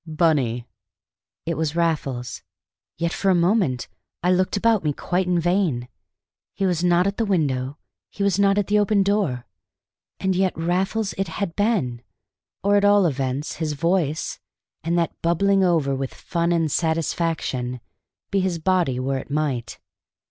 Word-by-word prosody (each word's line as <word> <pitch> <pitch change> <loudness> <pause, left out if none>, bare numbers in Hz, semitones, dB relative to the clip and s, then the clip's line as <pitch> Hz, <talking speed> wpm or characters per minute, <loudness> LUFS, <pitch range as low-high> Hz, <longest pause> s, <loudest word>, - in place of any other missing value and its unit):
"Bunny!" 145 -8 +1 0.8
It 165 0 -1
was 160 -1 -1
Raffles. 145 -7 -1 0.6
Yet 170 +1 -1
for 195 - 0
a 185 - +5
moment 175 - +1 0.4
I 180 - +3
looked 185 +2 +1
about 225 -2 +2
me 150 -2 +1
quite 180 +5 -1
in 180 -1 +2
vain. 170 -8 0 0.7
He 195 - 0
was 175 -2 0
not 175 0 +4
at 200 0 -1
the 230 - +1
window; 145 -9 0 0.3
he 200 - -4
was 200 -1 +2
not 200 0 +4
at 205 - +2
the 210 +2 +2
open 205 -1 +3
door. 190 - 0 0.7
And 190 -1 0
yet 190 -2 +1
Raffles 190 +5 0
it 195 - 0
had 165 +1 -4
been, 185 - 0 0.6
or 200 +1 +4
at 200 - +2
all 205 -1 +5
events 135 -1 -2
his 155 -2 -2
voice, 165 -1 0 0.4
and 170 +2 0
that 170 -1 -1
bubbling 195 +4 +3
over 160 -6 +2
with 135 -1 -4
fun 170 -1 -1
and 165 -3 +1
satisfaction, 160 -6 -1 0.5
be 200 - +2
his 185 -2 0
body 165 -7 +1
where 135 +1 -1
it - - -10
might. 140 -5 -2
170 Hz, 160 wpm, -23 LUFS, 145-195 Hz, 0.8 s, a